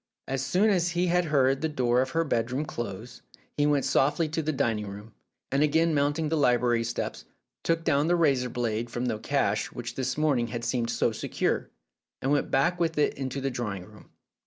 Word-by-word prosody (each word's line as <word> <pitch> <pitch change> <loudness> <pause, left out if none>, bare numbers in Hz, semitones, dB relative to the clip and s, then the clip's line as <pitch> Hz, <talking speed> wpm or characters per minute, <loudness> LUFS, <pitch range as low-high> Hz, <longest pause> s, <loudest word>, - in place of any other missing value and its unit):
As 135 0 -2
soon 185 +11 +3
as 180 -3 +2
he 180 - +3
had 180 0 +2
heard 135 -3 +2
the 160 - 0
door 125 -4 +2
of 130 - -1
her 165 +5 +1
bedroom 130 0 -1
close, 120 -3 -6 0.3
he 145 0 +2
went 145 -3 +2
softly 145 +4 +2
to 160 +1 -1
the 155 0 -1
dining 115 -7 -1
room, 105 +3 -9 0.4
and 140 +1 +2
again 160 +2 +3
mounting 145 +2 +1
the 160 - +1
library 120 -4 +3
steps, 115 0 -4 0.4
took 165 0 0
down 150 -2 +2
the 175 - +3
razor 140 -7 +2
blade 120 -1 -2
from 120 +1 -3
the 110 -3 -1
cache - - 0
which - - -6
this 130 0 -2
morn 150 -4 +2
ing 120 - -1
had 120 0 -5
seemed 115 -1 -1
so - - +1
secure, - - -2 0.5
and 135 - -1
went 145 -1 +1
back 170 +7 +2
with 165 -2 0
it 150 - +2
into 135 0 -4
the 135 0 -2
drawing 105 -7 -4
room. - - -17
135 Hz, 205 wpm, -27 LUFS, 120-155 Hz, 0.5 s, soon